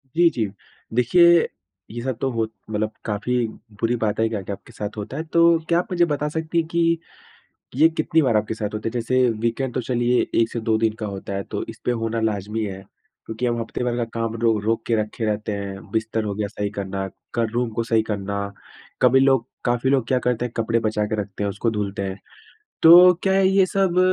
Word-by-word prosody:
जी, 170 0 +6
जी। 115 -8 -1 0.5
देखिए, 170 +8 +5 0.4
ये 120 +1 -5
सब 130 -1 -3
तो 135 - +1
हो 115 -1 0 0.3
मतलब 110 0 -1
काफ़ी 110 +4 -1 0.4
बुरी 115 +1 +2
बात 105 -1 0
है, 115 - +3
क्या-क्या 100 -2 -4
आपके 120 - -18
साथ 105 0 -6
होता 105 +6 -5
है। 160 - -2
तो 170 +1 +4
क्या 170 0 +4
आप - - -3
मुझे 175 -1 +3
बता 145 +1 0
सकती 160 +2 -3
हैं 165 -1 +2
कि 170 -1 +1 0.8
ये 155 +4 +6
कितनी 160 +1 +2
बार 120 -7 +3
आपके 105 +1 -1
साथ 105 -2 -3
होता 105 +1 -3
है? - - -2
जैसे, 125 +1 +2
वीकेंड 115 +3 -2
तो 130 - -1
चलिए 120 0 +1
1 115 - +1
से 120 - -3
2 110 - +4
दिन 110 -1 +1
का 110 - -1
होता 100 -1 -6
है 100 - -2
तो - - -2
इसपे - - -3
होना 115 0 -1
लाज़मी 105 0 -1
है, 95 -2 -6 0.5
क्योंकि 110 +2 -3
हम 120 -1 0
हफ़्ते 115 - -4
भर 120 -1 0
का 120 - 0
काम 115 0 -2
रो 115 -2 +3
रोक 115 +1 0
के 115 - +2
रखे 110 +2 -4
रहते 105 0 -1
हैं, 100 -1 -6
बिस्तर 110 0 -1
हो 100 -1 -3
गया 105 0 -2
सही 100 0 -3
करना, 95 0 -3 0.3
कर 115 -2 0
रूम 120 +1 0
को - - +2
सही 115 -1 +2
करना, 100 0 -2 0.6
कभी 130 +1 +6
लोग 135 -3 +3 0.2
काफ़ी 120 +1 +1
लोग 135 -4 +2
क्या 130 0 +2
करते 125 -1 0
हैं, 120 - -5
कपड़े 115 +1 +1
बचा 105 -1 0
के 110 - -2
रखते 100 0 -6
हैं, 100 - 0
उसको 100 +4 -1
धुलते 100 -2 -3
हैं। 95 0 -4 0.6
तो 180 +2 +10
क्या 190 0 +3
ये 195 0 +4
सब 185 -1 +1
115 Hz, 220 wpm, -22 LUFS, 105-130 Hz, 0.8 s, तो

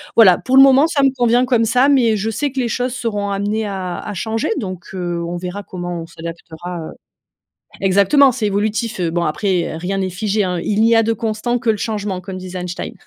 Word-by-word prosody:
Voilà, 190 -6 +7
pour 260 - -1
le 270 - +10
moment 275 +2 +6
ça 315 -4 0
me 270 - +5
convient 245 0 +3
comme 240 -3 +2
ça 250 +5 +3
mais 240 -6 +3
je 210 +2 -2
sais 280 +6 -2
que 265 - -4
les 245 - 0
choses 245 +2 -2
seront 210 -5 -2
amenées 205 +2 -1
à 185 -3 -4
à 210 - -6
changer 220 +4 -2
donc, 185 -5 -6
heu, 175 -2 -3
on 175 +1 -4
verra 185 +3 -5
comment 175 -2 -5
on - - -7
s'adaptera, 165 0 -8
heu. - - -9 0.9
Exactement! 200 +9 +4
C'est 230 -3 -3
évolutif, 210 +1 -1
heu, 170 -2 0
bon 170 0 0
après, 175 +1 -1
heu, - - -5
rien 185 +4 -3
n'est 190 -1 -1
figé, 210 +3 -1
hein: 180 -2 -1
«il 210 0 0
n'y 230 +1 +4
a 225 - +5
de 225 +1 +1
constant, 225 +2 -2
que 235 - -1
le 215 - -3
changement», 205 -3 -3
comme 185 +1 -7
disait 185 0 -7
Einstein. 180 0 -5
205 Hz, 230 wpm, -18 LUFS, 180-230 Hz, 0.9 s, le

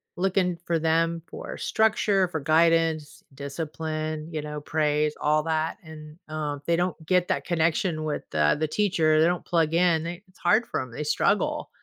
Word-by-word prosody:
looking 180 -1 +1
for 165 -1 +1
them 165 +1 +1
for - - -8
structure, 210 -3 +2
for 160 -2 -4
guidance, 160 0 +2
discipline, 155 +2 -4
you 155 - -2
know, 150 0 -5
praise, 150 0 0
all 150 +1 +2
that, 160 0 -1
and, 155 -1 -11
uh, 155 -2 -3
they 170 - +2
don't 180 +1 0
get 180 0 +2
that 140 - -1
connection 170 0 0
with 155 -1 -3
the 75 - +2
the 155 - 0
teacher, 165 -5 +2
they 160 - +5
don't 175 0 -1
plug 165 -2 +1
in, 170 -2 +3
it's 185 +2 -10
hard 215 +7 +3
for - - -2
'em, 130 -2 -8
they 150 - -5
struggle. 210 - 0
160 Hz, 175 wpm, -26 LUFS, 155-175 Hz, -, they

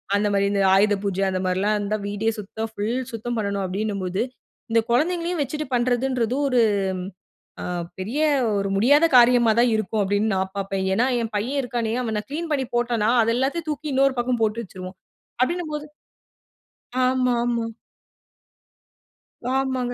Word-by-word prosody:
அந்தமாரி 200 -1 +2
இந்த 200 - +1
ஆயுத 205 +1 +4
பூஜை 195 -1 -1
அந்தமாரிலாம் 185 +3 0
இருந்தா 205 +1 -1
வீடே 205 +2 -1
சுத்தம் 220 +2 -5
ஃபுல் 225 +5 -1
சுத்தம் 235 +1 -3
பண்ணணும் 200 -2 -1
அப்பிடின்னும்போது, 195 -1 -2 0.5
இந்த 230 - +4
குழந்தைங்களையும் 340 +4 +1
வச்சுட்டு 300 +2 -4
பண்ணுறதுன்றது 245 0 0
ஒரு 250 -3 +3 1.0
அ - - -4 0.3
பெரிய 225 +11 -3 0.4
ஒரு 195 0 -1
முடியாத 285 +10 +5
காரியமா 240 -1 +6
தான் 245 +1 +5
இருக்கும் 215 0 -1
அப்பிடீன்னு 205 +2 +1
நான் 190 0 -1
பார்ப்பேன். 195 -1 -2
ஏன்னா 235 - +2 0.2
ஏன் 225 -1 -3
பையன் 255 +7 -1
இருக்கானே? 235 -2 -2
அவன் 220 -3 -2
நான் 210 - -7
கிளீன் 325 +2 -4
பண்ணி 270 -3 +1
போட்டன்னா, 235 -2 +1
அது 230 +1 +2
எல்லாத்தையும் 310 +5 -1
தூக்கி 300 0 -4
இன்னொரு 270 0 +3
பக்கம் 245 -1 -1
போட்டு 220 +2 0
வச்சுருவான். 185 0 -9 0.5
அப்பிடினம்போது 305 -1 -2 1.2
ஆமா, 255 -1 +2
ஆமா. 235 -1 0 1.9
ஆமாங்க. 260 -2 -1
230 Hz, 140 wpm, -23 LUFS, 205-260 Hz, 1.9 s, காரியமா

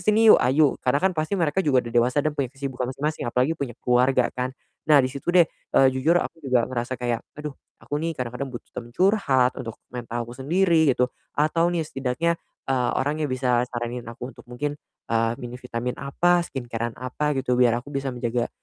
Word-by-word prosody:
sini 215 +4 +6
yuk?" - - +6
"Ayuk!" 140 +2 +3
Karena 130 +2 +2
kan 190 +5 +2
pasti 155 +3 -1
mereka 170 0 +1
juga 130 -8 +2
udah 120 - -7
dewasa 125 +5 +2
dan 155 - +1
punya 140 -3 -2
kesibukan 135 -1 -4
masing-masing 145 0 -2
apalagi 125 +6 +2
punya 135 -7 -5
keluarga 125 +1 +3
kan. 125 0 -2 0.4
Nah 150 - +7
di 130 - -2
situ 140 +3 -8
deh, 175 -1 +6
eee, 135 -3 +2
jujur 150 +7 +2
aku 170 - -2
juga 130 -5 +2
ngerasa 125 0 -3
kayak, 120 -2 -1 0.2
aduh, 150 -1 -5 0.3
aku 145 0 -2
nih 165 -1 -2
kadang-kadang 125 +2 -4
butuh 120 -2 -9
teman 120 - -7
curhat 140 -11 +3
untuk 115 -3 -6 0.2
mental 120 -1 -4
aku 120 - -10
sendiri 165 +1 +3
gitu 125 -1 +3 0.3
atau 160 +3 +2
nih 170 -2 -1
setidaknya, 135 +3 -1 0.3
eee, 130 -2 +1
orang 145 +3 0
yang 150 - 0
bisa 125 -1 +1
saranin 120 0 -4
aku 125 +3 -7
untuk - - -17
mungkin, 145 +4 -3 0.4
eee, 115 0 +2
minum 125 +1 -8
vitamin 125 0 -4
apa, 175 +6 +2
skincare-an 120 -3 -4
apa 140 +4 -2
gitu 125 -2 +1
biar 120 -2 +5
aku 145 - -11
bisa 135 -1 -2
menjaga, 120 -1 -1
130 Hz, 200 wpm, -24 LUFS, 125-150 Hz, 0.4 s, Nah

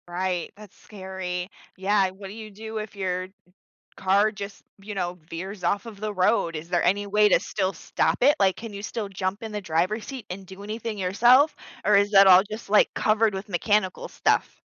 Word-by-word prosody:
Right, 180 0 -2
that's 210 -2 -14
scary. 190 -2 -6 0.3
Yeah, 195 0 +2
what 195 +1 -10
do 190 - -9
you 215 0 -9
do 220 +2 -7
if 215 0 -7
your 185 -2 -2 0.7
car 200 +3 +2
just, 200 -1 -8 0.2
you 205 +2 -8
know, 180 -2 -3
veers 190 +4 -7
off 200 +6 0
of 210 -3 -10
the 215 0 -3
road? 185 -3 +2
Is 155 +2 -7
there 175 -1 +2
any 200 +3 +1
way 210 +1 +4
to - - +5
still 190 -1 -2
stop - - -1
it? 285 +3 +6
Like, 190 -1 +3
can 230 -1 -8
you 200 0 -7
still 210 0 -4
jump 190 +1 -3
in 220 -1 -6
the 210 - -3
driver's 185 +5 -1
seat 260 -6 -7
and 190 +1 -7
do 190 +2 -11
anything 215 +1 -5
yourself, 240 +10 +4 0.3
or 210 - +4
is 200 +1 +3
that 195 -1 +8
all 185 0 +8
just, 215 -1 -7
like, 210 - +5
covered 215 -1 +2
with 195 +2 -6
mechanical 200 +1 0
stuff? - - 0
200 Hz, 205 wpm, -25 LUFS, 185-215 Hz, 0.7 s, that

